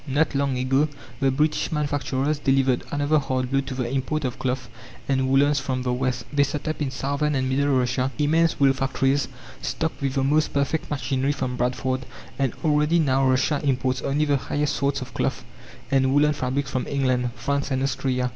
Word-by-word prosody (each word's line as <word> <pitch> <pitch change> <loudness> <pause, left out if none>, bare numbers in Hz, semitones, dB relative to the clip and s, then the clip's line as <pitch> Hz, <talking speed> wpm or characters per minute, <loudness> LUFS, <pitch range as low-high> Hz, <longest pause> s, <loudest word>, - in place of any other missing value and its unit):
Not 145 +4 +1
long 140 -2 0
ago 135 +4 +2 0.3
the 135 - +3
British 150 +3 0
manufacturers 145 -1 -1
delivered 135 -2 +2
another 145 +1 +2
hard 130 -2 -2
blow 135 0 +2
to 135 -1 -6
the 125 -2 -2
import 135 +4 -1
of 125 - -3
cloth 125 -1 -2 0.4
and 130 -1 +1
woolens 140 +2 +4
from 130 -2 -2
the 125 -1 0
West. 125 -1 -1
They 145 - +3
set 145 +1 -1
up 155 0 -2
in 140 - 0
southern 140 +3 -1
and 130 -1 0
middle 140 +2 +1
Russia 125 +1 0
immense 160 +2 +2
wool 135 -1 +5
factories, 135 +1 0 0.3
stocked 160 -2 -3
with 135 0 -1
the 135 - +1
most 150 +3 +2
perfect 140 +3 0
machinery 140 -1 0
from 130 -3 -3
Bradford, 130 +1 -1 0.3
and 135 -3 +1
already 150 +2 +3
now 135 -4 +3
Russia 135 +3 +2
imports 130 -2 0
only 145 +2 +1
the 145 -1 +2
highest 145 +2 -1
sorts 140 0 0
of 130 -1 -8
cloth - - -1 0.5
and 135 -1 +3
woolen 150 +2 +4
fabrics 135 0 -2
from 130 - -2
England, 130 -3 +1
France 140 +4 -1
and 130 -1 0
Austria. 130 -1 0
135 Hz, 190 wpm, -24 LUFS, 130-145 Hz, 0.5 s, wool